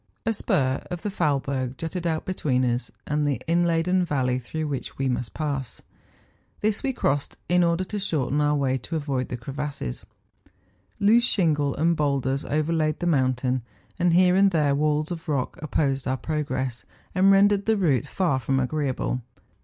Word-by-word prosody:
A 225 - +2
spur 130 -9 0
of 175 -1 -5
the 205 - -2
Faulberg 135 -6 -1
jutted 170 +1 -3
out 160 -1 -1
between 135 -9 0
us 120 +1 -1 0.2
and 150 0 0
the 140 - 0
inladen 170 +2 +2
valley 130 -6 0
through 155 +5 -4
which 140 -3 -5
we 135 - 0
must 125 -2 -2
pass; 140 -5 -3 0.8
this 210 -1 +1
we 270 - 0
crossed 145 - -1
in 180 0 +4
order 170 +1 +2
to 205 +3 -4
shorten 150 -6 0
our 150 0 +2
way 135 -2 +1
to 165 - -6
avoid 140 -5 -2
crevasses. 140 - -5 1.0
Loose 225 +4 +5
shingle 150 - +2
and 165 +2 +2
boulders 140 -2 0
overlaid 155 0 0
the - - -2
mountain; 130 -4 +1 0.4
and 175 -1 +3
here 180 0 +5
and 195 +1 +5
there 150 -6 +2
walls 150 +2 +1
of 165 -1 -6
rock 140 -4 -1
opposed 140 -3 0
our 130 +1 0
progress, 135 -4 -3 0.3
and 190 +1 +4
rendered 200 +1 +4
the 220 -1 +3
route 150 -7 +1
far 170 -7 0
from 135 +2 0
agreeable. 130 -2 -1
150 Hz, 165 wpm, -25 LUFS, 135-175 Hz, 1.0 s, Loose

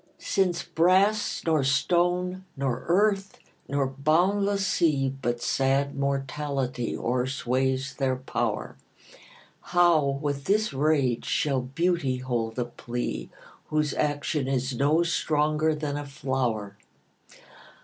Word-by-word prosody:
LXV. - - -18
SINCE 180 -3 +1
brass, 190 +6 +2
nor 160 -4 +2
stone, 180 +6 +1
nor 130 -3 -2
earth, 195 +2 +2 0.3
nor 140 -1 0
boundless 185 +9 +1
sea, 145 -8 +2
But 120 -1 -2
sad 135 +1 +1
mortality 135 -2 -2
o'er 125 +2 0
sways 130 +1 -1
their 135 -2 0
power, 130 - -3 0.8
How 165 -6 +3
with 140 -1 -3
this 215 -3 +1
rage 135 -4 +1
shall 145 -5 +1
beauty 135 0 0
hold 120 -3 -3
a 125 - 0
plea, 120 0 -5 0.4
Whose 150 -2 0
action 145 -1 -1
is 130 -1 -1
no 150 +6 +3
stronger 155 -2 +1
than 150 -1 -3
a 145 -1 -5
flower? 125 -8 -2
140 Hz, 115 wpm, -26 LUFS, 130-170 Hz, 0.8 s, How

